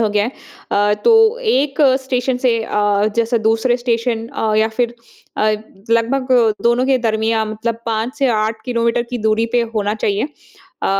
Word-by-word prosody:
हो 220 - +2
गया 205 0 +1
है। 245 - -4 0.4
अ, 205 +1 +3
तो 450 0 +5
एक 290 - 0 0.2
स्टेशन 255 -1 -1
से 230 -2 +2
अ, 205 -1 +1
जैसे 230 0 +1
दूसरे 225 +2 +2
स्टेशन 230 -1 -1
अ, 225 -5 -1
या 220 +1 +3
फिर 240 -1 0 0.4
अ, 215 - +1 0.4
लगभग 240 +3 +1 0.3
दोनों 240 +2 +2
के 265 -1 +3
दरमियाँ 220 0 0
मतलब 220 +2 -4
5 225 +3 -2
से 275 - +2
8 220 0 -3
किलोमीटर 235 -1 0
की 245 - -3
दूरी 220 +1 +1
पे 245 - +3
होना 210 0 0
चाहिए। 210 +3 -1 0.6
अ, - - +2
230 Hz, 170 wpm, -18 LUFS, 220-250 Hz, 0.6 s, तो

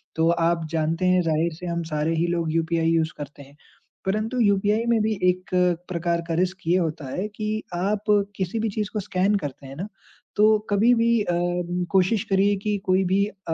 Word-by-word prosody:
तो 165 +1 +2
आप 170 -1 +1
जानते 165 +2 0
हैं 185 0 +4
ज़ाहिर 165 0 0
से 175 +3 -9
हम 170 -1 -2
सारे 155 +2 0
ही 165 +2 +1
लोग 170 -2 -1
यूपीआई 165 0 +1
यूज़ 165 -1 +1
करते 145 -1 -8
हैं, 140 +1 -18 0.5
परंतु 215 +5 -1
यूपीआई 210 +1 +2
में 230 -2 +3
भी 215 +1 +1 0.2
एक 185 0 -2 0.4
प्रकार 170 -1 -1
का 165 - -2
रिस्क 185 +2 0
ये 175 - +4
होता 160 -4 -2
है 195 +3 -2
कि, 215 +1 -3
आप 200 +4 -1 0.3
किसी 190 +4 -2
भी 220 0 0
चीज़ 210 0 -3
को 210 - -1
स्कैन 190 +2 +1
करते 140 -5 -7
हैं 135 - -9
ना, 185 +8 -5 0.5
तो 215 +1 +5
कभी 215 +4 +4
भी 230 -1 +2
अ, 175 - -1 0.6
कोशिश 195 +3 +2
करिए 200 +1 +3
कि 210 -1 0
कोई 185 +1 +3
भी 195 +2 +2
अ, 195 -5 -6
185 Hz, 200 wpm, -24 LUFS, 165-210 Hz, 0.6 s, तो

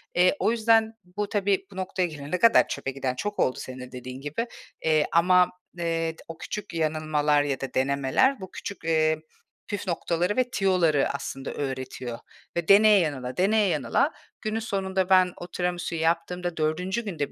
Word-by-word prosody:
Eee, 180 +8 +4
o - - +2
yüzden 225 -1 +3 0.2
bu 210 -1 -1
tabii 200 -2 +1
bu - - -13
noktaya 185 -1 -1
gelene 150 +2 -4
kadar 230 +3 +6
çöpe 135 - -3
giden 135 -1 -3
çok 205 +9 -4
oldu 130 - +2
senin 130 0 -7
de 125 0 -9
dediğin 125 +1 -8
gibi. 150 - -3 0.3
Eee, 155 -1 +3
ama, 180 +1 +5 0.3
eee, 165 -1 -1
t - - -16
o 165 -1 -8
küçük 210 - -6
yanılmalar 155 -2 +1
ya 140 -2 -2
da 135 - -5
denemeler 140 - +2
bu 190 -1 -9
küçük, 200 - -7
eee, 160 -1 +2 0.5
püf 205 -1 -4
noktaları 175 +4 0
ve 250 -1 +2
tüyoları 180 - +2
aslında 135 -1 -5
öğretiyor. 130 -3 -5 0.4
Ve 170 -1 -1
deneye 205 0 +7
yanıla, 130 -6 -2
deneye 205 +3 +3
yanıla 155 - +1 0.3
günün 215 0 -2
sonunda 190 -4 -1
ben, 185 -1 +5
o 175 - -8
tiramisuyu 175 -2 -2
yaptığımda 170 +1 -1
4'üncü 180 +8 -1
günde 160 -8 -3
170 Hz, 170 wpm, -26 LUFS, 145-195 Hz, 0.5 s, deneye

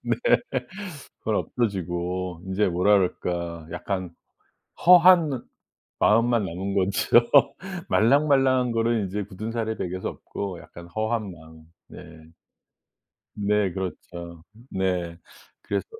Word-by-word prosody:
네. - - 0 1.0
그건 110 -1 -1
없어지고 90 -5 -2
이제 100 +3 +2
뭐라 90 +4 +3
그럴까 85 -3 -3
약간 95 -3 -4 0.7
허한 180 -2 +8
느 130 -3 -3 0.6
마음만 115 0 +3
남은 95 +3 -4
거죠. 100 +5 +3 0.6
말랑말랑한 130 0 +3
거는 115 -3 +1
이제 100 +2 -3
굳은살에 110 +3 -4
배겨서 95 +1 -3
없고 95 -4 -6
약간 85 0 -13
허한 110 +1 -2
마음. 80 -1 -15 0.2
네. - - -11 1.3
네 105 -2 +1
그렇죠. 85 -2 -7 0.3
네. 90 -3 -2 0.4
그래서 - - -2
100 Hz, 220 characters per minute, -25 LUFS, 90-115 Hz, 1.3 s, 허한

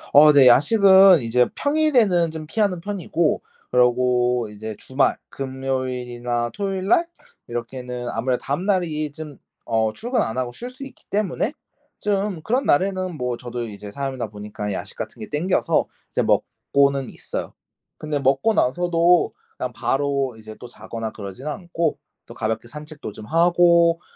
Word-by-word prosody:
어 150 +1 +9
네. 140 -3 +6
야식은 190 - +7
이제 120 +1 +3
평일에는 255 - +2
좀 160 -1 -7
피하는 190 +2 0
편이고 180 -4 -1 0.3
그러고 125 -1 +2
이제 110 +1 -7
주말, 130 +1 +1
금요일이나 125 -3 -3
토요일 195 -2 -3
날 335 - +4 0.4
이렇게는 125 +1 -5
아무래도 125 +2 -1
다음날이 155 -1 -1
좀 150 -2 -9 0.3
어 110 -1 +1
출근 240 +2 -1
안 110 +3 -2
하고 125 -1 -1
쉴 240 - -7
수 255 +2 -10
있기 270 - -15
때문에 210 - -1 0.4
좀 200 -4 -1
그런 250 - 0
날에는 185 +2 +1
뭐 125 -3 -2
저도 120 -1 -5
이제 100 0 -9
사람이다 135 -2 -4
보니까 105 0 -6
야식 - - -6
같은 - - -6
게 110 - -7
당겨서 165 +6 +1 0.2
이제 - - +1
먹고는 140 -1 +1
있어요. - - -6 0.4
근데 150 -1 -3
먹고 135 +11 +2
나서도 175 +3 +2 0.2
그냥 125 - -3
바로 135 +2 -1
이제 110 0 -10
또 125 - -9
자거나 115 -2 -6
그러진 100 +6 -8
않고 170 0 -2 0.3
또 - - -11
가볍게 110 +2 -3
산책도 150 -4 -8
좀 110 - -10
하고 170 +2 +4
140 Hz, 315 characters per minute, -22 LUFS, 120-175 Hz, 0.4 s, 어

